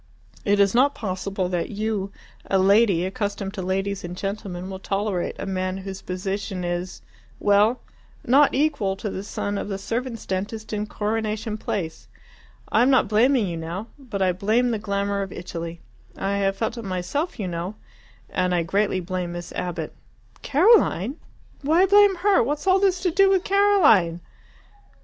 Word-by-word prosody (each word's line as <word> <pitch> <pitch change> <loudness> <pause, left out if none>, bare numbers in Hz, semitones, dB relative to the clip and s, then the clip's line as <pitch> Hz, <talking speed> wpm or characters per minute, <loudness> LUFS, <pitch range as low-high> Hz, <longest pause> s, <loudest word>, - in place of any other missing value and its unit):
It 205 0 +2
is 200 -1 +4
not 270 +4 +4
possible 190 -2 -3
that 175 -2 -2
you, 210 -2 -2 0.4
a 195 - +3
lady, 195 -2 +4
accustomed 200 0 -3
to 200 - -5
ladies 195 +2 -2
and 175 +1 -6
gentlemen, 195 -2 -4
will 190 0 -6
tolerate 195 -2 -2
a - - -5
man 185 -1 -2
whose 195 -1 -6
position 190 0 -4
is 175 +1 -4 0.4
well, 210 +4 +3 0.4
not 275 +4 +5
equal 270 -10 +1
to 200 +1 -5
the 190 - -4
son 205 0 -3
of - - -4
the 195 - -2
servants' 230 +3 -4
dentist 210 +4 -4
in 210 0 -2
Coronation 215 +1 -2
Place. 180 -6 -4 0.6
I 225 - +4
am 250 - +5
not 260 - +4
blaming 235 +2 +3
you 170 -3 -4
now. 170 +7 -5
But 220 -8 -3
I 185 - +3
blame 220 +7 +1
the 220 - -1
glamour 200 -1 -1
of 195 -1 -4
Italy 170 -1 -6 0.4
I 200 +1 -1
have 195 -1 0
felt 230 +1 -2
it - - -6
myself, 195 - -3
you 195 - -2
know 175 +4 -4 0.5
and 180 -1 0
I 170 - +1
greatly 195 +2 0
blame 180 -1 -3
Miss 175 0 -7
Abbott." 170 -3 -4 0.5
"Caroline! 295 - +3 0.4
Why 320 +6 +4
blame 405 0 +6
her? 385 +2 +3
What's 290 +5 -2
all 380 0 +4
this 380 -2 +2
to 360 -1 +1
do 390 +3 +5
with 380 -2 +3
Caroline?" 350 - +4
200 Hz, 170 wpm, -24 LUFS, 185-235 Hz, 0.6 s, blame